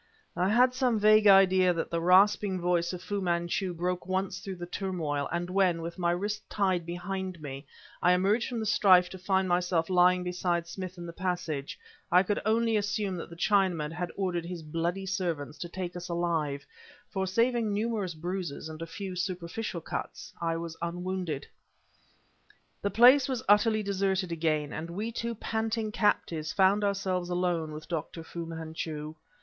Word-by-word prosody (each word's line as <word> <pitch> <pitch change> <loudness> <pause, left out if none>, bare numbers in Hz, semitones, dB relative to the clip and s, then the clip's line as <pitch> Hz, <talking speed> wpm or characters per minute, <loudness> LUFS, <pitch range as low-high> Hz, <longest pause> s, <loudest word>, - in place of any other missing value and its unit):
I 180 +2 +1
had 250 +4 +4
some 255 -3 +1
vague 215 0 +6
idea 190 -2 +6
that 165 - -3
the 170 0 0
rasping 190 +2 +4
voice 175 -1 +1
of 180 -1 -7
Fu 200 +1 -2
Manchu 175 +1 0
broke 180 +1 -3
once 190 +1 -1
through 195 -1 -6
the 175 -1 -6
turmoil, 170 -6 -2
and 175 0 -2
when, 180 -2 +2
with 170 +2 -6
my 175 -1 +1
wrists 205 +5 -1
tied 185 -4 0
behind 185 +1 -4
me, 140 -1 -7 0.3
I 180 - +5
emerged 200 +7 +2
from 240 -2 -3
the 220 - -2
strife 185 -4 +5
to 190 - -8
find 190 0 +1
myself 175 -1 +1
lying 180 0 +4
beside 180 -1 -1
Smith 185 +1 -7
in 175 - -7
the 170 - -7
passage, 175 -6 -3 0.3
I 180 +2 +6
could 205 +2 -1
only 225 0 +2
assume 205 -1 -1
that 165 - -7
the 170 - -10
Chinaman 175 -5 +1
had 175 +1 -4
ordered 180 -3 -1
his 170 -1 -6
bloody 170 +5 -2
servants 170 -6 -3
to 175 - -5
take 180 0 -5
us 180 +1 -6
alive; 165 -5 -1 0.5
for 190 -1 -1
saving 230 +2 +1
numerous 205 -4 -1
bruises 170 -2 -4
and 155 0 -8
a 165 - -4
few 190 +2 -6
superficial 180 +1 -3
cuts, 185 +3 -6
I 165 -1 0
was 165 -1 -5
unwounded. 175 -3 -3 1.4
The 200 - 0
place 250 +6 +6
was 255 -3 -2
utterly 215 +1 +4
deserted 195 -2 0
again, 155 -3 0
and 165 +1 -5
we 210 +7 -3
two 235 0 -3
panting 220 0 -2
captives 170 -8 0
found 195 +2 +4
ourselves 190 -3 -1
alone 175 -3 0
with 155 0 -8
Dr. 165 0 -4
Fu 170 0 -6
Manchu. 160 -2 -5
180 Hz, 175 wpm, -29 LUFS, 170-200 Hz, 1.4 s, vague